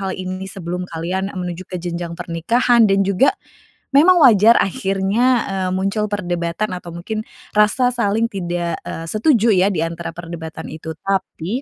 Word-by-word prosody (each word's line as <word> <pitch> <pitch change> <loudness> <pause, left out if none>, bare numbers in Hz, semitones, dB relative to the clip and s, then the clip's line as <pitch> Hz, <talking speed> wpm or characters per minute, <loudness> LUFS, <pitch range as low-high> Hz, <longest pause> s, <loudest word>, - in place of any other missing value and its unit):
hal 190 -1 -3
ini 185 +1 -5
sebelum 180 -1 -5
kalian 185 +4 -2
menuju 180 0 -5
ke 185 - -4
jenjang 170 -1 -5
pernikahan 230 +8 +2
dan 195 0 +3
juga 200 +8 +2 0.6
memang 345 +6 +6
wajar 230 - +6
akhirnya, 195 +4 0 0.2
eee, 190 -1 -2
muncul 195 +3 -1
perdebatan 175 0 -2
atau 180 -1 -7
mungkin 175 +6 -5 0.3
rasa 225 +4 +3
saling 225 -1 +1
tidak, 175 -5 -3
eee, 165 - -6
setuju 225 - +3
ya, 190 +1 +3
di 165 -5 -1
antara 170 +1 -5
perdebatan 165 -2 -8
itu. 160 +1 -8
Tapi 195 - -2
190 Hz, 150 wpm, -19 LUFS, 170-210 Hz, 0.6 s, memang